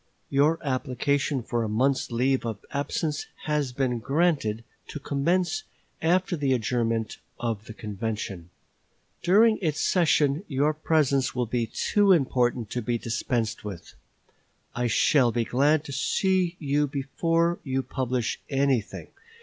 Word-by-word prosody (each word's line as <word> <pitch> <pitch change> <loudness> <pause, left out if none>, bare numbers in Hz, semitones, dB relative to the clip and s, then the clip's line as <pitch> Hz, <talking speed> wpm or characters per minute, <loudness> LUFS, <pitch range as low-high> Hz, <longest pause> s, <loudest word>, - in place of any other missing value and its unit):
Your 145 +4 +3
application 135 0 -1
for 120 0 -1
a 110 - -2
month's 130 +5 +1
leave 130 +3 +1
of 110 -3 -5
absence 145 +2 -2 0.2
has 150 -4 0
been 125 -2 -1
granted 135 -5 0 0.2
to 150 - -6
commence 160 +5 0 0.4
after 180 +2 +2
the 140 -4 +1
adjournment 115 -2 -1 0.2
of 115 -3 -3
the 110 - -9
convention. 105 -5 -5 0.7
During 215 +5 +4
its 155 -4 -1
session 155 -3 +2
your 145 +1 +1
presence 145 -4 +1
will 125 -1 0
be 115 0 -1
too 205 - +3
important 125 - +1
to 125 - -2
be 120 +1 -1
dispensed 115 0 -2
with. 95 -5 -8 0.8
I 120 0 0
shall 120 +2 +3
be 115 0 0
glad 145 +5 +2
to 145 - -8
see 180 +7 +1
you 145 0 0
before 165 +5 0
you 135 -2 -1
publish 125 -3 -2
anything. 135 -6 0
135 Hz, 135 wpm, -26 LUFS, 120-155 Hz, 0.8 s, During